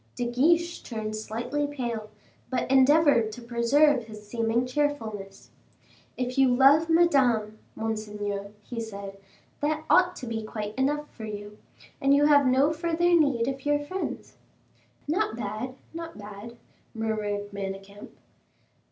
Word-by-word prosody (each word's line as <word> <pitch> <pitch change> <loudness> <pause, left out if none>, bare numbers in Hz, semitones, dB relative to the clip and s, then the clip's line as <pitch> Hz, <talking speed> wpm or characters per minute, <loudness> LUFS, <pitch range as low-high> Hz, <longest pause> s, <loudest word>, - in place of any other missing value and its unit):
De 245 - -2
Guiche 330 +8 +2
turned 215 -2 -5
slightly 235 +7 -3
pale, 235 -6 -4 0.4
but 260 0 -1
endeavored 270 -4 +5
to 215 - -9
preserve 245 +3 +3
his 210 -1 -11
seeming 230 +2 0
cheerfulness. 240 -8 -3 0.7
"If 250 +1 -2
you 270 - +6
love 275 +6 +5
Madame, 255 -11 +3 0.2
monseigneur," 210 -2 -4
he 235 +1 -5
said, 200 -3 -8 0.4
"that 305 +1 -1
ought 360 0 +5
to 255 - -7
be 225 -1 -3
quite 215 -1 -5
enough 295 +4 0
for 220 - -8
you, 210 0 -8 0.4
and 275 +1 +4
you 290 +1 +4
have 285 -2 +5
no 270 +4 +3
further 340 +2 +1
need 280 -8 +3
of 270 0 -3
your 290 0 +2
friends." 330 +7 -5 0.7
"Not 345 - 0
bad, 225 +3 -4 0.2
not 330 0 -7
bad," 210 +3 -10 0.4
murmured 210 -2 -2
Manicamp. 195 +1 -7
240 Hz, 135 wpm, -27 LUFS, 215-290 Hz, 0.7 s, you